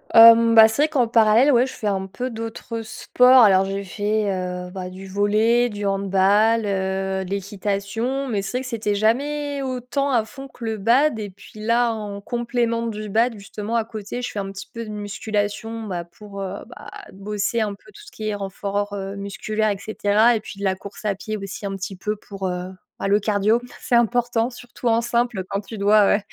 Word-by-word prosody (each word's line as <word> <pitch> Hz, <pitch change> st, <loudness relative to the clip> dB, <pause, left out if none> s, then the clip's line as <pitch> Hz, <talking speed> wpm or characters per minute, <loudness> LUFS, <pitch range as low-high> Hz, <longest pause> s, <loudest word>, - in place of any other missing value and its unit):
Hem, 230 Hz, 0 st, +9 dB
bah, 220 Hz, -1 st, +10 dB
c'est 220 Hz, +6 st, -1 dB
vrai -, -, +4 dB
qu'en 265 Hz, -6 st, +2 dB
parallèle, 225 Hz, +4 st, +5 dB
ouais, 250 Hz, 0 st, +4 dB
je -, -, -8 dB
fais -, -, -8 dB
un 190 Hz, -2 st, -1 dB
peu 250 Hz, +7 st, -5 dB
d'autres 225 Hz, 0 st, -5 dB
sports. 250 Hz, +3 st, +5 dB
Alors, 195 Hz, -2 st, +5 dB
j'ai 195 Hz, +1 st, -3 dB
fait, 205 Hz, +2 st, -1 dB
heu, 180 Hz, -1 st, -4 dB
bah, 185 Hz, -1 st, -6 dB
du 185 Hz, +1 st, -10 dB
volley, 215 Hz, +5 st, +2 dB
du 205 Hz, -2 st, -5 dB
handball, 200 Hz, +3 st, +3 dB
heu, 190 Hz, -1 st, -1 dB
de 180 Hz, -, -9 dB
l'équitation. 205 Hz, +6 st, -2 dB
Mais 215 Hz, -5 st, -1 dB
c'est 195 Hz, +6 st, -3 dB
vrai -, -, -2 dB
que -, -, -7 dB
c'était 215 Hz, -3 st, -1 dB
jamais 285 Hz, +7 st, 0 dB
autant 260 Hz, +1 st, -2 dB
à 235 Hz, -4 st, +2 dB
fond 270 Hz, +4 st, -10 dB
que 245 Hz, -3 st, -10 dB
le 220 Hz, -1 st, -2 dB
bad. 235 Hz, +5 st, +3 dB
Et 205 Hz, -1 st, -4 dB
puis 195 Hz, +3 st, -15 dB
là, 230 Hz, +2 st, +2 dB
en 205 Hz, -2 st, -6 dB
complément 235 Hz, 0 st, -1 dB
du 215 Hz, -1 st, -5 dB
bad, 225 Hz, +3 st, +1 dB
justement, 210 Hz, +2 st, -5 dB
à 230 Hz, -1 st, +1 dB
côté, 220 Hz, +2 st, -6 dB
je -, -, -3 dB
fais 205 Hz, -, -4 dB
un 195 Hz, -1 st, -4 dB
petit 195 Hz, 0 st, -9 dB
peu 230 Hz, -, -5 dB
de 220 Hz, -, -9 dB
musculation, 210 Hz, +2 st, -3 dB
bah, 180 Hz, -5 st, -4 dB
pour, 200 Hz, +3 st, -10 dB
heu, 195 Hz, 0 st, -4 dB, 0.2 s
bah, -, -, -11 dB, 0.2 s
heu, -, -, -14 dB
bosser 205 Hz, +3 st, -2 dB
un 210 Hz, -2 st, -1 dB
peu 300 Hz, -, -19 dB
tout 415 Hz, -, -13 dB
qui 215 Hz, -1 st, -4 dB
est -, -, -1 dB
renfort 200 Hz, +1 st, -3 dB, 0.2 s
musculaire 215 Hz, +2 st, -2 dB
et 200 Hz, -, -1 dB
cetera. 215 Hz, +3 st, +2 dB
Et -, -, 0 dB
puis 200 Hz, -2 st, -10 dB
de -, -, -6 dB
la 190 Hz, -1 st, +2 dB
course 200 Hz, +3 st, -11 dB
à 210 Hz, -, +2 dB
pied 215 Hz, +3 st, -5 dB
aussi 195 Hz, 0 st, -6 dB
un 195 Hz, -, -4 dB
petit 195 Hz, 0 st, -5 dB
peu 210 Hz, +3 st, -3 dB
pour, 195 Hz, -2 st, -6 dB
heu, 180 Hz, 0 st, -4 dB, 0.3 s
bah, -, -, -1 dB
le 200 Hz, +1 st, +4 dB
cardio. 210 Hz, +2 st, +2 dB, 0.2 s
C'est -, -, -4 dB
important, 240 Hz, 0 st, +2 dB
surtout 245 Hz, 0 st, -7 dB
en 230 Hz, 0 st, +3 dB
simple, 235 Hz, -4 st, 0 dB
quand 200 Hz, +1 st, -2 dB
tu 220 Hz, +2 st, -9 dB
dois, 205 Hz, 0 st, +5 dB
heu, -, -, +1 dB
215 Hz, 215 wpm, -22 LUFS, 200-230 Hz, 0.3 s, bah